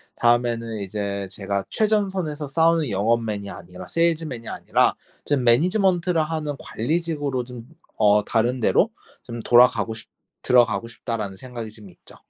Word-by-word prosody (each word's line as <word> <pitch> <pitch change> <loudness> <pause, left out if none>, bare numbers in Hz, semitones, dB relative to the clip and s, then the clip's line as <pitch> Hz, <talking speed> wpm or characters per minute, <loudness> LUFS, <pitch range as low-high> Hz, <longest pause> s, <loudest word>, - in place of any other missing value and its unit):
다음에는 120 -2 +1
이제 100 0 -3
제가 100 0 -2
'최전선에서 190 -8 0
싸우는 165 0 +2
영업맨이 105 0 0
아니라 90 0 -10
세일즈맨이 160 -8 -1
아니라 - - +1 0.3
좀 145 -2 +1
management를 175 - +3
하는 155 -2 -3
관리직으로 145 -1 -2
좀 120 -1 -10 0.3
어 105 -1 +5
다른 120 +3 +1
데로 110 - +3 0.3
좀 120 0 -7
돌아가고 120 -2 +4
싶 110 - -11 0.3
들어가고 120 -2 +3
싶다.'라는 110 -4 -5
생각이 120 -3 -7
좀 105 -2 -13
있죠. - - -15
120 Hz, 370 characters per minute, -23 LUFS, 110-155 Hz, 0.3 s, 어